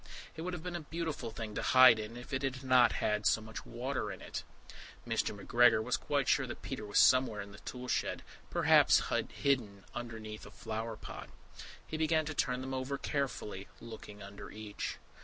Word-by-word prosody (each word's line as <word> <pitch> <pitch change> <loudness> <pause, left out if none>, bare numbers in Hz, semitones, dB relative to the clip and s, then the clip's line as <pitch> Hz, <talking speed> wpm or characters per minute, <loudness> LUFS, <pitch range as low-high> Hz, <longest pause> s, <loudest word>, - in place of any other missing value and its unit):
It 160 - -6
would 180 +2 -3
have 170 -3 -5
been 180 -1 -4
a - - -2
beautiful 160 -3 -4
thing 110 -1 -6
to - - -2
hide 130 -3 +7
in, 110 +2 -6
if 125 - -9
it 130 - 0
had 135 -1 -2
not 130 -2 +5
had 105 -2 +1
so 100 - +4
much 110 0 -8
water 130 +3 -3
in - - -8
it. - - -5 0.7
Mr. 100 - -1
McGregor 120 +2 +4
was - - +1
quite - - 0
sure - - +3
that - - -8
Peter 105 - -5
was 100 - -1
somewhere 130 -5 +5
in 100 0 -6
the 100 - -12
toolshed, 125 +2 -3 0.3
perhaps - - +5 0.2
hidden 115 -8 0
underneath 115 -3 -6
a - - -10
flower 110 0 -5
pot. - - -8 0.6
He 155 - -4
began 160 0 +2
to 155 - -3
turn 125 -3 0
them 130 0 -4
over 130 +1 -2
carefully, 125 -10 -3
looking 110 -3 -10
under 100 +1 -9
each. 105 -1 -5
120 Hz, 190 wpm, -33 LUFS, 110-135 Hz, 0.7 s, hide